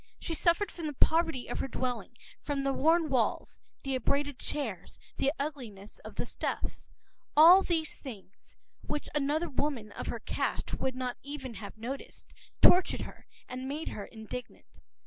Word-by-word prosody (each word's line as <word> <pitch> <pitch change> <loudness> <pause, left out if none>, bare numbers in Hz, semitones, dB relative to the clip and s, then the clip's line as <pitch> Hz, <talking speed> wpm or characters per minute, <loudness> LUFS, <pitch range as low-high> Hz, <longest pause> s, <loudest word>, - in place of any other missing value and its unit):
She 330 - -3
suffered 340 +4 +3
from 330 -3 -4
the 300 - -3
poverty 320 -2 +2
of - - -3
her - - 0
dwelling, 245 -3 -3 0.2
from 285 -2 -1
the 275 0 +2
worn 320 +4 +4
walls, 255 -6 0 0.2
the 270 - -1
abraded 280 +2 0
chairs, 225 - -4 0.2
the 275 - +3
ugliness 240 -9 -5
of - - -10
the - - -2
stuffs. - - -3 0.5
All 345 +5 +10
these 325 -4 0
things, 205 -7 -11 0.2
which 300 0 -3
another 295 +3 +1
woman 260 -7 -1
of - - -6
her - - -2
caste - - -2
would 260 -1 -1
not 255 -1 -2
even 275 -3 -6
have 210 -1 -8
noticed, 255 +5 -7 0.3
tortured 360 +1 +7
her - - -9 0.2
and 255 +1 -5
made 300 +3 -3
her 205 - -5
indignant. 225 +2 -9
275 Hz, 160 wpm, -31 LUFS, 245-305 Hz, 0.5 s, All